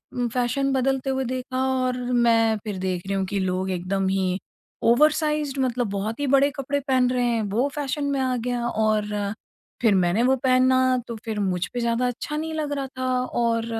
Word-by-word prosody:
उम, 245 Hz, -1 st, 0 dB
fashion 250 Hz, +3 st, 0 dB
बदलते 270 Hz, 0 st, 0 dB
हुए 265 Hz, 0 st, 0 dB
देखा 255 Hz, 0 st, -2 dB, 0.2 s
और 250 Hz, 0 st, 0 dB
मैं 230 Hz, -2 st, +3 dB
फिर 205 Hz, -3 st, -4 dB
देख 185 Hz, -1 st, -3 dB
रही 195 Hz, -, -1 dB
हूँ 190 Hz, -, 0 dB
कि 200 Hz, +1 st, -2 dB
लोग 185 Hz, 0 st, -1 dB
एकदम 190 Hz, +2 st, -1 dB
ही 190 Hz, -1 st, 0 dB, 0.5 s
ओवरसाइज्ड 300 Hz, -1 st, +2 dB
मतलब 245 Hz, -3 st, -1 dB
बहुत 210 Hz, +4 st, -3 dB
ही 290 Hz, -, -1 dB
बड़े 275 Hz, +1 st, +4 dB
कपड़े 285 Hz, +1 st, -1 dB
पहन 260 Hz, -2 st, +2 dB
रहे 250 Hz, -1 st, +1 dB
हैं 235 Hz, -2 st, +1 dB
वो 245 Hz, +7 st, +2 dB
फ़ैशन 290 Hz, 0 st, -2 dB
में 275 Hz, -, 0 dB
आ 255 Hz, -1 st, 0 dB
गया 240 Hz, 0 st, -2 dB
और 215 Hz, -2 st, +1 dB, 0.7 s
फिर 220 Hz, -4 st, +4 dB
मैंने 180 Hz, +4 st, +2 dB
वो 265 Hz, +1 st, +4 dB
पहना 255 Hz, 0 st, +4 dB, 0.3 s
तो 235 Hz, -, -5 dB
फिर 220 Hz, -2 st, -3 dB
मुझ 185 Hz, -3 st, 0 dB
पे 245 Hz, -, -2 dB
ज़्यादा 235 Hz, +1 st, +1 dB
अच्छा 250 Hz, +5 st, -4 dB
नहीं 320 Hz, +1 st, -3 dB
लग 305 Hz, -2 st, -2 dB
रहा 275 Hz, -1 st, -3 dB
था 255 Hz, -, -1 dB, 0.2 s
और 230 Hz, -2 st, 0 dB
245 Hz, 195 wpm, -24 LUFS, 210-265 Hz, 0.7 s, बड़े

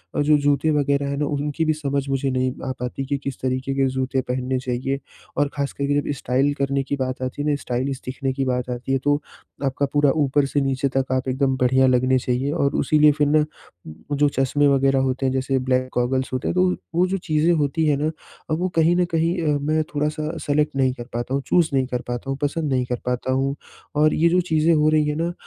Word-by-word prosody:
अ, -, -, +1 dB
जो 150 Hz, 0 st, +4 dB
जूते 145 Hz, +2 st, +2 dB
वग़ैरह 140 Hz, -1 st, +1 dB
हैं 140 Hz, -, -2 dB
ना 150 Hz, -, 0 dB
उनकी 145 Hz, +2 st, -1 dB
भी 155 Hz, -, +2 dB
समझ 140 Hz, -2 st, -2 dB
मुझे 135 Hz, 0 st, 0 dB
नहीं 130 Hz, 0 st, 0 dB, 0.2 s
आ -, -, 0 dB
पाती 125 Hz, +2 st, -4 dB
कि 140 Hz, +1 st, -1 dB
किस 140 Hz, -2 st, -5 dB
तरीके 130 Hz, +1 st, -1 dB
के 135 Hz, -1 st, +2 dB
जूते 130 Hz, 0 st, 0 dB
पहनने 130 Hz, 0 st, -1 dB
चाहिए। 130 Hz, +2 st, -2 dB, 0.4 s
और 145 Hz, -1 st, +2 dB
ख़ास 140 Hz, -1 st, -1 dB
करके 145 Hz, +1 st, 0 dB
जब 145 Hz, -, -3 dB
स्टाइल 135 Hz, +3 st, +1 dB
करने 140 Hz, 0 st, +1 dB
की 140 Hz, -, -2 dB
बात 130 Hz, 0 st, -4 dB
आती 130 Hz, +3 st, -3 dB
है 150 Hz, -, 0 dB
ना 145 Hz, -, +2 dB
स्टाइलिश 130 Hz, +2 st, -2 dB
दिखने 130 Hz, +1 st, -3 dB
की 135 Hz, 0 st, -1 dB
बात 125 Hz, -1 st, -1 dB
आती 125 Hz, +2 st, -4 dB
है 135 Hz, -, +3 dB
तो 145 Hz, +1 st, +2 dB, 0.4 s
आपका 135 Hz, +1 st, 0 dB
पूरा 145 Hz, -1 st, +4 dB
ऊपर 145 Hz, 0 st, +2 dB
से 140 Hz, +1 st, 0 dB
नीचे 135 Hz, 0 st, 0 dB
तक 130 Hz, -1 st, 0 dB
आप 130 Hz, 0 st, 0 dB
एकदम 130 Hz, 0 st, +1 dB
बढ़िया 130 Hz, +1 st, +3 dB
लगने 130 Hz, +1 st, +3 dB
चाहिएँ। 125 Hz, +3 st, -1 dB
और 140 Hz, -4 st, +1 dB
उसी 155 Hz, -, +2 dB
लिए 150 Hz, 0 st, +7 dB
फ़िर 145 Hz, -1 st, +3 dB
ना 150 Hz, +1 st, +4 dB, 0.7 s
जो 145 Hz, 0 st, +4 dB
चश्मे 140 Hz, +2 st, +2 dB
वग़ैरह 135 Hz, -1 st, +3 dB
होते 130 Hz, 0 st, 0 dB
हैं 130 Hz, -, +1 dB
जैसे 130 Hz, 0 st, 0 dB
ब्लैक 130 Hz, 0 st, 0 dB
गॉगल्स 130 Hz, +2 st, 0 dB
होते 130 Hz, -, -2 dB
हैं -, -, -2 dB
तो 180 Hz, -, +4 dB
वो 180 Hz, -, 0 dB, 0.2 s
वो 180 Hz, +1 st, +4 dB
जो 195 Hz, +1 st, -1 dB
चीज़ें 160 Hz, -1 st, +1 dB
होती 155 Hz, +1 st, +1 dB
हैं 145 Hz, -, +3 dB
ना 155 Hz, +2 st, 0 dB, 0.4 s
अब 155 Hz, -, +2 dB
वो 185 Hz, -, 0 dB
कहीं 165 Hz, +1 st, +4 dB
न 180 Hz, -, +3 dB
कहीं 165 Hz, +2 st, +1 dB
अ, 150 Hz, -2 st, +2 dB
मैं 155 Hz, +2 st, +1 dB
थोड़ा-सा 150 Hz, +2 st, -1 dB
सेलेक्ट 150 Hz, 0 st, +1 dB
नहीं 130 Hz, -1 st, +2 dB
कर 120 Hz, -, -8 dB
पाता 120 Hz, +2 st, -3 dB
हूँ 140 Hz, -, 0 dB
चूज़ 170 Hz, -3 st, +3 dB
नहीं 130 Hz, -1 st, +2 dB
कर 125 Hz, -1 st, -3 dB
पाता 120 Hz, +2 st, -4 dB
हूँ 135 Hz, -, -2 dB
पसंद 145 Hz, 0 st, -1 dB
नहीं 125 Hz, -1 st, +1 dB
कर 125 Hz, -1 st, -3 dB
पाता 125 Hz, +1 st, -1 dB
हूँ। 135 Hz, +1 st, 0 dB, 0.4 s
और 155 Hz, +1 st, +4 dB
ये 170 Hz, +2 st, +3 dB
जो 180 Hz, +2 st, +3 dB
चीज़ें 160 Hz, +1 st, +3 dB
हो 155 Hz, 0 st, +3 dB
रही 155 Hz, -1 st, +3 dB
हैं 150 Hz, -, -1 dB
ना 170 Hz, +1 st, -1 dB
140 Hz, 245 wpm, -22 LUFS, 130-150 Hz, 0.7 s, लिए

